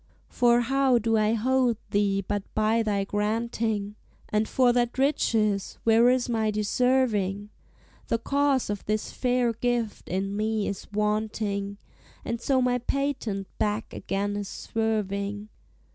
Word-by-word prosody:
For 240 Hz, 0 st, +3 dB
how 265 Hz, +1 st, +3 dB
do 225 Hz, 0 st, +1 dB
I 215 Hz, 0 st, +3 dB
hold 250 Hz, +1 st, +2 dB
thee 200 Hz, -1 st, +1 dB
but 205 Hz, 0 st, -1 dB
by 220 Hz, +1 st, +2 dB
thy 205 Hz, -3 st, 0 dB
granting? 210 Hz, 0 st, -1 dB, 0.3 s
And 215 Hz, +1 st, +1 dB
for 250 Hz, -2 st, +3 dB
that 240 Hz, 0 st, 0 dB
riches 220 Hz, -7 st, +1 dB
where 230 Hz, +2 st, +5 dB
is 255 Hz, -1 st, +2 dB
my 220 Hz, -2 st, 0 dB
deserving? 210 Hz, -2 st, +1 dB, 0.6 s
The -, -, +1 dB
cause 275 Hz, -1 st, +1 dB
of 205 Hz, -, -4 dB
this 215 Hz, 0 st, -1 dB
fair 245 Hz, -2 st, +1 dB
gift 235 Hz, -1 st, -2 dB
in 195 Hz, +2 st, -2 dB
me 215 Hz, 0 st, 0 dB
is 200 Hz, +1 st, -6 dB
wanting, 210 Hz, -1 st, -1 dB, 0.5 s
And 235 Hz, 0 st, -3 dB
so 260 Hz, -1 st, +2 dB
my 250 Hz, 0 st, +1 dB
patent 250 Hz, -6 st, -2 dB
back 210 Hz, +1 st, -1 dB
again 200 Hz, +1 st, -2 dB
is 205 Hz, -1 st, -4 dB
swerving. 205 Hz, -2 st, -2 dB
220 Hz, 135 wpm, -26 LUFS, 205-245 Hz, 0.6 s, where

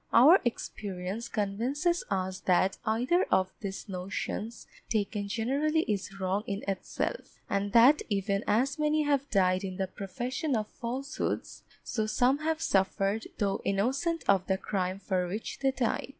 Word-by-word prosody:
Our 310 Hz, +11 st, +8 dB
experience 200 Hz, -2 st, -4 dB
convinces 250 Hz, -, 0 dB
us 190 Hz, -1 st, -1 dB
that 185 Hz, +1 st, +3 dB
either 250 Hz, +12 st, +2 dB
of 185 Hz, 0 st, +2 dB
these 200 Hz, 0 st, -5 dB
notions 195 Hz, +4 st, -4 dB, 0.2 s
taken 205 Hz, -1 st, -1 dB
generally 275 Hz, +9 st, +1 dB
is 195 Hz, -5 st, -3 dB
wrong 190 Hz, +2 st, 0 dB
in 200 Hz, +1 st, -3 dB
itself, 195 Hz, -, -3 dB
and 200 Hz, 0 st, -1 dB
that 250 Hz, +6 st, +7 dB
even 200 Hz, 0 st, 0 dB
as 260 Hz, +8 st, +2 dB
many 300 Hz, 0 st, +2 dB
have 285 Hz, -1 st, +1 dB
died 185 Hz, -2 st, +2 dB
in 185 Hz, -1 st, -4 dB
the 190 Hz, -, 0 dB
profession 245 Hz, -, -3 dB
of 215 Hz, -1 st, -2 dB
falsehoods, 260 Hz, +5 st, -4 dB, 0.2 s
so 220 Hz, -2 st, -1 dB
some 250 Hz, +5 st, +2 dB
have 320 Hz, +1 st, -1 dB
suffered 195 Hz, +1 st, +1 dB
though 200 Hz, -2 st, 0 dB
innocent 270 Hz, -, 0 dB
of 195 Hz, -2 st, +3 dB
the 190 Hz, -, +2 dB
crime 190 Hz, -1 st, -2 dB
for 185 Hz, -2 st, -1 dB
which 210 Hz, +5 st, -5 dB
they 270 Hz, -, +2 dB
died. 255 Hz, -2 st, -1 dB
215 Hz, 150 wpm, -30 LUFS, 195-265 Hz, 0.2 s, Our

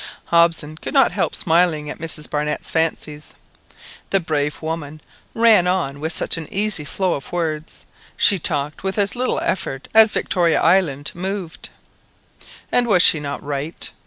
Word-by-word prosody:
Hobson 165 Hz, -2 st, +1 dB
could 285 Hz, -, -7 dB
not 270 Hz, -3 st, +5 dB
help -, -, -1 dB
smiling 165 Hz, -3 st, +1 dB
at 150 Hz, -, -7 dB
Mrs 160 Hz, -2 st, -1 dB
Barnett's 150 Hz, 0 st, -3 dB
fancies. 155 Hz, -2 st, -2 dB, 0.7 s
The 195 Hz, -, +3 dB
brave 150 Hz, -3 st, -2 dB
woman 155 Hz, -2 st, -5 dB, 0.4 s
ran 225 Hz, -6 st, +5 dB
on 170 Hz, -7 st, -1 dB
with 160 Hz, +2 st, -3 dB
such 170 Hz, -, 0 dB
an 160 Hz, -2 st, -8 dB
easy 200 Hz, -6 st, -1 dB
flow 185 Hz, +4 st, -1 dB
of 140 Hz, -, -7 dB
words, 160 Hz, -3 st, -4 dB, 0.3 s
she 200 Hz, -3 st, +5 dB
talked 150 Hz, -1 st, -1 dB
with 190 Hz, +1 st, -3 dB
as 200 Hz, +1 st, 0 dB
little 255 Hz, +1 st, -1 dB
effort 135 Hz, -7 st, -3 dB
as 220 Hz, -1 st, +7 dB
Victoria 170 Hz, -3 st, +1 dB
Island 160 Hz, -5 st, +1 dB
moved. 185 Hz, -1 st, -5 dB, 1.0 s
And 245 Hz, -1 st, +3 dB
was 185 Hz, -5 st, +5 dB
she 155 Hz, -, +7 dB
not 145 Hz, -1 st, -6 dB
right? 145 Hz, +3 st, -4 dB
165 Hz, 155 wpm, -20 LUFS, 150-190 Hz, 1.0 s, as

